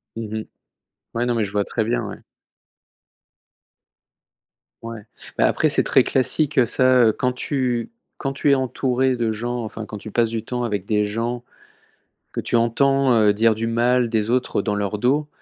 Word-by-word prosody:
Mmh 110 -1 -5
mh. 110 - -5 0.7
Ouais 120 +1 0
non, 120 - 0
mais 110 - +1
je 100 - -4
vois 105 0 +1
très - - -2
bien, - - -1
ouais. - - -7 2.6
Ouais. 115 -1 -7 0.4
Bah, - - +4
après - - +2
c'est - - +3
très - - +4
classique 135 0 +2
ça, 130 +2 +3
heu, - - +5
quand 125 +2 -1
tu 125 -3 -2 0.3
quand 135 - -3
tu 140 +1 +1
es 140 - +6
entouré 130 0 0
de 115 -2 0
gens 120 +2 -3
enfin 110 0 -7
quand 105 - -8
tu 110 - -9
passes 115 +1 +1
du 115 -1 -3
temps 125 -1 -3
avec 105 -5 -2
des 105 -1 +1
gens, 115 +3 -3 0.9
que - - -3
tu - - -4
entends, 135 +3 +2
heu, 105 -3 +4
dire 110 +2 +3
du 115 - -2
mal 120 +1 +2
des 110 -1 -1
autres 125 -5 0
dans 105 - -1
leur 100 0 -2
dos. 145 +6 +1
115 Hz, 185 wpm, -22 LUFS, 110-125 Hz, 2.6 s, es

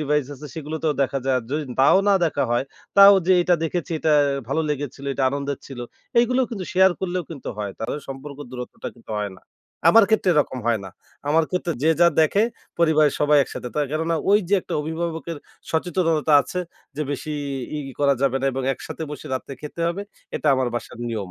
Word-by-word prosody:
Device 150 -2 +1
আছে 150 +3 -10
সেগুলোতেও 155 0 -2
দেখা 135 +1 -1
যায়। 130 -1 +3
যদি 150 +1 -1 0.2
তাও 140 +8 +6
না 200 - +6
দেখা 145 -3 -1
হয় 120 +2 +1 0.3
তাও 200 0 +10
যে 185 - +5
এটা 175 - +3
দেখেছি 170 +1 -3
এটা 155 - +2 0.4
ভালো 160 +4 +1
লেগেছিল, 140 -1 -4
এটা 140 - -1
আনন্দের 140 0 -3
ছিল। 135 -3 -8 0.4
এগুলো 250 +2 +2
কিন্তু 200 -6 -4
শেয়ার 190 +1 +6
করলেও 180 -1 -1
কিন্তু 150 -5 -7
হয়। 100 -2 -3
তাদের 125 +6 -3
সম্পর্ক 135 +1 -8
দূরত্বটা 125 -1 -7
কিন্তু 115 -2 -10
হয় 100 -2 -3
না। - - -29 0.5
আমার 225 +5 +8
ক্ষেত্রে 210 -4 +3
এরকম 145 -3 +1
হয় 115 -3 +2
না। 95 - -8 0.4
আমার 160 +2 +4
ক্ষেত্রে 180 -2 -1
যে 160 - +4
যা 175 - +8
দেখে 195 +7 +3 0.4
পরিবারের 155 -3 +4
সবাই 150 0 +5
একসাথে। 125 - -6
তা 150 - +1
কেননা 160 +2 0
ঐ - - +5 0.2
যে 205 - +4
একটা - - -6
অভিভাবকের 165 0 -4 0.3
সচেতনতা 160 -2 +1
আছে 180 - -4 0.4
যে, 150 - -1
বেশি 145 +2 -4 0.4
ই - - -2 0.2
করা 140 -1 +4
যাবে 135 -1 +2
না 135 - 0
এবং 135 - -3
একসাথে 160 - -8
বসে 150 - -7
রাতে 135 +1 -5
খেতে 150 +3 -8
হবে। 190 +4 -3 0.3
এটা - - -5
আমার 130 -1 0
বাসার 120 0 -5
নিয়ম। 105 -5 -4
150 Hz, 195 wpm, -23 LUFS, 135-170 Hz, 0.5 s, তাও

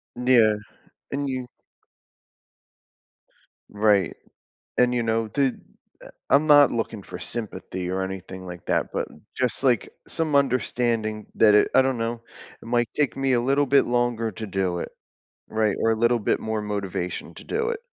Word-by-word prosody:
Yeah. 120 -3 +4 0.6
And 140 0 -1
you 130 -1 -3 2.2
Right, 105 -3 +2 0.6
and, 125 0 +4
you 120 - +1
know, 115 -1 0
the 140 - 0
eh, 125 - -3 0.8
I'm 140 +3 +5
not 145 -1 +7
looking 110 -3 -3
for 90 - -8
sympathy 95 -4 -5
or 95 +1 -1
anything 95 0 -6
like 90 -2 -9
that, - - 0
but - - -2 0.3
just, 125 +1 -1
like, 125 -4 +2 0.2
some 160 -3 -1
understanding 120 -5 0
that 105 -2 +6
it 105 - +4
I - - +7
don't 130 -1 0
know, 115 0 -3 0.4
it - - -13
might 120 0 +1
take 150 -2 +1
me 135 -1 +1
a 120 - +3
little 140 +3 +2
bit 140 +1 +4
longer 120 -2 0
to 110 +3 -6
do 95 -2 -1
it. - - -5 0.6
Right? 110 -2 +1
Or, 115 - +3
a - - +2
little 120 +2 +2
bit 105 - 0
more 110 -1 -2
motivation 100 -4 -4
to - - -11
do 455 +1 -1
it. 470 -2 -3
115 Hz, 165 wpm, -24 LUFS, 105-130 Hz, 2.2 s, not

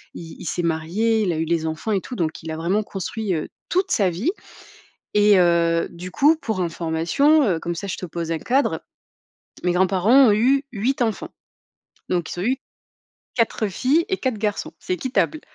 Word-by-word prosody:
il 165 -1 -9
il - - -8
s'est 175 - -2
marié, 175 +8 +1
il 180 -4 0
a - - -3
eu 160 - 0
les 165 0 0
enfants 160 +7 -3
et 195 - +1
tout 250 - -7
donc 160 -7 -3
il 160 - -5
a 160 - -4
vraiment 185 +6 0
construit, 205 +1 -3
heu, 155 - -3 0.2
toute 370 +2 +1
sa 195 -3 +3
vie. 195 - -1 0.9
Et 205 -2 +6
heu, 170 -1 +3
du 180 +1 -8
coup 295 - +4
pour 220 - -3
information, 170 - +2
heu, 175 -5 +1
comme 170 +1 -4
ça 200 - -5
je 190 - -4
te - - -5
pose 165 0 -4
un 165 - -1
cadre, 265 - +1 0.8
mes 180 - +2
grands-parents 195 +8 +5
ont - - +5
eu 265 +6 +3
8 245 +5 -1
enfants. 225 -3 -1 0.8
Donc 175 -2 -1
ils - - -6
ont - - -2
eu 255 +5 +1 0.8
4 230 -2 +1
filles 270 - +1
et 380 - 0
4 255 -5 -2
garçons, 210 -1 -2
c'est 185 - -2
équitable. 265 - -1
195 Hz, 195 wpm, -22 LUFS, 170-235 Hz, 0.9 s, Et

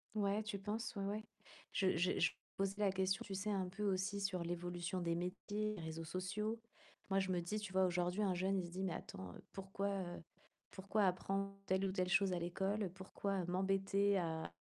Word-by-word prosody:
Ouais, 205 0 +2
tu 210 -2 -3
penses, 210 +3 -2
ouais, 200 - -1
ouais. 210 +2 -1 0.5
Je 190 -3 +3
je 180 +2 +3
je 165 - +5 0.3
posais 195 +1 0
la 200 - +5
question, 190 0 +1
tu 195 - -4
sais 205 +2 -1
un 190 -2 +1
peu 195 +3 -4
aussi 195 0 +1
sur 195 -3 0
l'évolution 175 +1 -2
des 170 -1 +1
métiers, 205 +4 -1
réseaux 160 -1 -4
sociaux. 210 +6 -1 0.5
Moi 195 - +4
je 190 -1 +1
me 180 - +2
dis, 210 +5 -1
tu 210 -2 -5
vois? 190 0 +5
Aujourd'hui 180 +2 +1
un 190 - +3
jeune 190 +2 +2
il 175 - -1
se 170 - -8
dit: 185 +2 -2
«Mais 185 -3 0
attends 90 -1 -6 0.2
pourquoi, 195 +1 -2
heu, 180 -4 -3 0.5
pourquoi 200 +2 +1
apprendre 195 +2 +1 0.2
telle 190 +1 +3
ou 190 - +1
telle 185 -1 +1
chose 195 0 +4
à 175 - +1
l'école, 190 +4 0
pourquoi 190 0 -2
m'embêter 195 +2 +3
à 160 - -1
190 Hz, 200 wpm, -39 LUFS, 180-200 Hz, 0.5 s, je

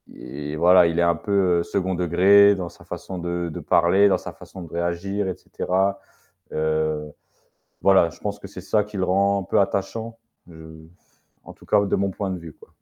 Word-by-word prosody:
et 75 +4 -7
voilà 90 +1 +6
il 85 +1 -1
est - - +4
un 85 -1 +3
peu 95 -4 +1
2nd 95 +1 -2
degré 95 +4 +5
dans 90 -2 -5
sa - - -18
façon 95 - -7
de 85 0 -3
de 75 - -7
parler, 95 +4 +4
dans - - +2
sa - - -8
façon 95 - -12
de - - -10
réagir 85 +4 -2
et 95 - -3
cetera. 95 +2 -2 0.5
Heu, 80 -1 -1 0.7
voilà, 95 -4 +4
je - - -17
pense 105 0 -4
que 100 - -9
c'est 95 - -10
ça 105 +1 +1
qui 105 -1 -10
le 95 - +1
rend 100 +2 +2
un - - -7
peu - - +1
attachant, 110 +4 -3 0.3
je 80 -1 -13 0.6
en - - -11
tout - - -19
cas 105 -1 +3
de 100 - 0
mon 100 0 0
point 95 0 -4
de 90 - -4
vue, 80 -2 -11
quoi. - - -18
90 Hz, 205 wpm, -23 LUFS, 85-100 Hz, 0.7 s, voilà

